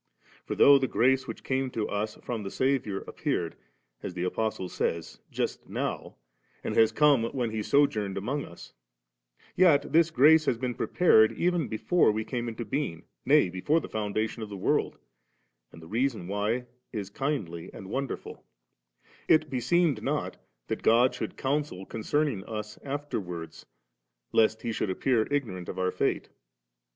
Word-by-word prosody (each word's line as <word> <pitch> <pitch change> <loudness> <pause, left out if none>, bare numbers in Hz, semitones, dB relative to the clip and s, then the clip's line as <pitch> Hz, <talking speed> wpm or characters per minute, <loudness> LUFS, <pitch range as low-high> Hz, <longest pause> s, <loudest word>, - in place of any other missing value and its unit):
For - - -2
though 140 -1 +7
the 130 - 0
grace 130 +2 +2
which - - -7
came 130 0 -1
to 115 -3 -2
us 105 +1 -2
from 120 -3 -3
the 100 - -5
Saviour 130 -5 0
appeared, - - -2 0.5
as 90 - -6
the 90 - -2
Apostle 100 0 -2
says, 85 -2 -3
just - - -3
now, - - -4 0.5
and - - -2
has 110 -1 +5
come 140 -2 +4
when 120 -2 -2
He 110 0 -2
sojourned 110 -7 +1
among 135 +9 -2
us; 85 - -12 0.8
yet 170 -6 +4
this 165 0 +5
grace 155 +2 +6
had 115 - 0
been 125 -1 -2
prepared 110 -7 +4
even 175 -5 0
before 115 +7 +2
we 110 +1 -2
came 120 -1 -3
into 115 0 -5
being, 130 - -3 0.2
nay, - - +5
before 95 - +1
the - - -7
foundation 110 +2 -2
of 110 - -5
the 100 - -6
world, - - 0 0.7
and 80 - -13
the - - -11
reason 115 -2 -1
why 105 +5 -1 0.3
is 100 -4 -5
kindly 100 - -3
and 95 - -10
wonderful 135 +6 -5 0.8
It 155 -2 +4
beseemed 135 +1 +2
not - - -2 0.3
that - - -4
God 120 +3 +4
should - - -5
counsel 140 -8 -2
concerning 115 0 -1
us 105 -1 -6
afterwards, 90 - -5 0.6
lest 110 0 +3
He 115 - -1
should 110 - -2
appear 110 +4 +1
ignorant 110 -12 -2
of - - -6
our 90 0 0
fate. - - -1
115 Hz, 160 wpm, -28 LUFS, 105-140 Hz, 0.8 s, though